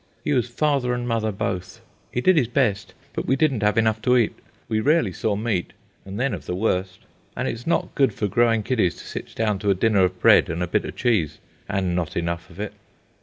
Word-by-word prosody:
He - - 0
was 125 -2 +1
father 130 -1 +1
and 120 0 -3
mother, 115 -2 0
both. 95 -3 -4 0.3
He 125 - -1
did 185 +7 +5
his 140 -7 +3
best, 115 -5 0 0.2
but - - -4
we 130 - +3
didn't 135 -5 +1
have 105 0 +2
enough 110 -1 +2
to 125 +2 +4
eat. 115 -3 +2 0.3
We 110 - 0
rarely 145 - +2
saw 105 +4 -1
meat, 105 -4 -2 0.3
and 100 +2 -6
then 130 -1 0
of 90 - -7
the 90 - -2
worst. 95 -2 -1 0.4
And - - -1
it - - 0
is 115 +4 -10
not 170 - 0
good 135 -2 +3
for 105 - -2
growing 115 +1 +2
kiddies 110 -8 +1
to - - -11
sit - - -7
down 105 -3 0
to 100 +1 -1
a 100 - +4
dinner 100 0 +3
of 90 0 0
bread - - +6
and 85 +2 -2
a - - -2
bit - - 0
of - - -6
cheese, 110 - +1 0.3
and 95 -2 0
not 85 -3 -2
enough 85 0 -3
of - - -14
it. - - -4
110 Hz, 235 wpm, -23 LUFS, 95-125 Hz, 0.4 s, bread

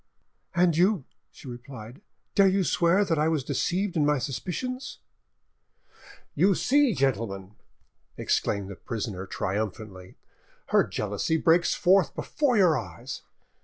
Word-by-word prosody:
"And 175 -2 +3
you," 180 -3 +2 0.2
she - - -14
replied, 120 - -10 0.3
"dare 200 -1 +5
you 190 0 +2
swear 180 +3 +2
that 165 -5 0
I 155 - +2
was 160 -4 0
deceived 180 +8 -1
in 155 - +2
my 150 0 +3
suspicions?" 220 - -4 1.4
"You 195 0 +3
see, 275 -2 +3
gentlemen," 105 -8 -1 0.6
exclaimed 100 -1 -1
the 100 - -7
prisoner 100 -3 -5
triumphantly, 100 -1 -4 0.5
"her - - +4
jealousy 105 +10 -1
breaks 170 +2 +3
forth 185 -4 +3
before 280 -6 0
your 175 -8 +4
eyes. 90 -7 -8
155 Hz, 125 wpm, -27 LUFS, -, 1.4 s, dare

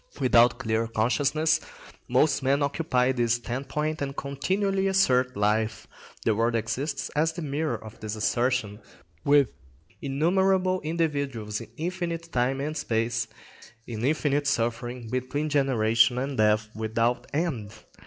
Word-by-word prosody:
Without 120 -1 +5
clear 110 0 -1
consciousness 145 +8 +1 0.5
most 135 +4 +3
men 140 +2 +2
occupy 135 -3 +1
this 120 -2 +1
standpoint 140 +6 -3
and 140 0 -3
continually 190 +8 0
assert 130 - +2
life. 110 +2 0 0.4
The 110 - +4
world 115 +2 +1
exists 135 +6 -2
as 160 +2 +1
the 170 0 -5
mirror 150 +2 -1
of 110 -1 -12
this 110 0 -4
assertion, 120 -1 0 0.4
with 140 -3 +4 0.5
innumerable 185 +6 +2
individuals 140 -10 -2
in 115 - -10
infinite 170 -1 -3
time 130 +2 0
and 155 +2 -3
space, 115 -3 -1 0.6
in 115 -1 -5
infinite 145 0 +1
suffering, 120 -1 -1
between 130 +6 -2
generation 120 -4 +3
and 135 +2 -2
death 105 -1 +2
without 115 +3 0
end. 140 -10 -2
130 Hz, 125 wpm, -26 LUFS, 115-150 Hz, 0.6 s, Without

